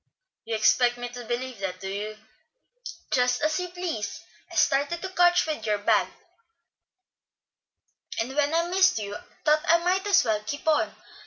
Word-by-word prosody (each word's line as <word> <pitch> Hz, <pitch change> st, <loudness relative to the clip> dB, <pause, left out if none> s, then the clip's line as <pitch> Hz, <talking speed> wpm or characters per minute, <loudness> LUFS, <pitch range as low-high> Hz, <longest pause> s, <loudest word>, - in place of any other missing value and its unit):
"You 225 Hz, -, -2 dB
expect 240 Hz, +3 st, +3 dB
me 245 Hz, 0 st, -5 dB
to 245 Hz, 0 st, -9 dB
believe 245 Hz, 0 st, -4 dB
that, 185 Hz, -2 st, -4 dB
do 190 Hz, -, -6 dB
you?" 210 Hz, +2 st, -5 dB, 0.9 s
"Just 250 Hz, 0 st, +2 dB
as 310 Hz, +2 st, +1 dB
you 360 Hz, -, -3 dB
please. 345 Hz, -, -4 dB, 0.3 s
I -, -, -9 dB
started 285 Hz, +5 st, +2 dB
to 380 Hz, -, -3 dB
catch 355 Hz, -1 st, +4 dB
you 315 Hz, -, -1 dB
with 225 Hz, -, -13 dB
your 210 Hz, -1 st, +2 dB
bag, 205 Hz, -, +2 dB, 2.1 s
and 250 Hz, +4 st, -3 dB
when 290 Hz, 0 st, +2 dB
I 330 Hz, +1 st, +2 dB
missed 370 Hz, -2 st, +3 dB
you, 205 Hz, -1 st, -4 dB, 0.3 s
thought 305 Hz, 0 st, +4 dB
I 335 Hz, -, +6 dB
might 365 Hz, +3 st, 0 dB
as 400 Hz, -, +5 dB
well 215 Hz, -2 st, 0 dB
keep 285 Hz, +9 st, -6 dB
on. 310 Hz, -1 st, +2 dB
260 Hz, 170 wpm, -26 LUFS, 220-340 Hz, 2.1 s, I